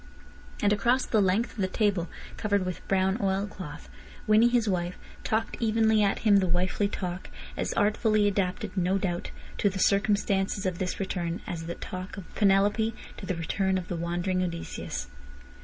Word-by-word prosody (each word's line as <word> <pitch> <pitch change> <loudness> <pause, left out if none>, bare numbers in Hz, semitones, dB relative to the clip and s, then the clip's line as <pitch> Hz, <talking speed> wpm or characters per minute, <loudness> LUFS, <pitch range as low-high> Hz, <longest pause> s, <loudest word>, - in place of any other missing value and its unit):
And 205 0 +5
across 240 +6 +2
the 215 - +2
length 195 +5 +2
of - - -17
the 190 - +2
table 190 -3 +1 0.3
covered 205 -3 0
with 180 -1 -5
brown 190 +2 +2
oil 195 0 +1
cloth 170 -7 -9 0.4
Winnie, 215 +2 +6
his 240 -2 +2
wife, 180 -2 -1 0.3
talked 220 +1 -1
evenly 220 -1 +3
at 200 -1 +2
him 205 -2 +7
the 190 -1 +2
wifely 180 +3 +1
talk, 180 -2 -5 0.3
as - - -2
artfully 215 0 +3
adapted, 200 +1 -1
no 185 +1 +2
doubt, 175 -3 -2 0.3
to 205 - +3
the 195 - -5
circumstances 200 0 +2
of 180 -2 -1
this 185 -1 -2
return 175 -3 -2
as 165 -1 -5
the 170 - -4
talk 185 +1 -7
of 190 - -10
Penelope 205 +2 +3 0.2
to - - -7
the 185 - -1
return 190 +3 0
of 180 -1 -5
the 175 - -2
wandering 175 +2 -1
Odysseus. 170 - -4
195 Hz, 175 wpm, -28 LUFS, 180-210 Hz, 0.4 s, him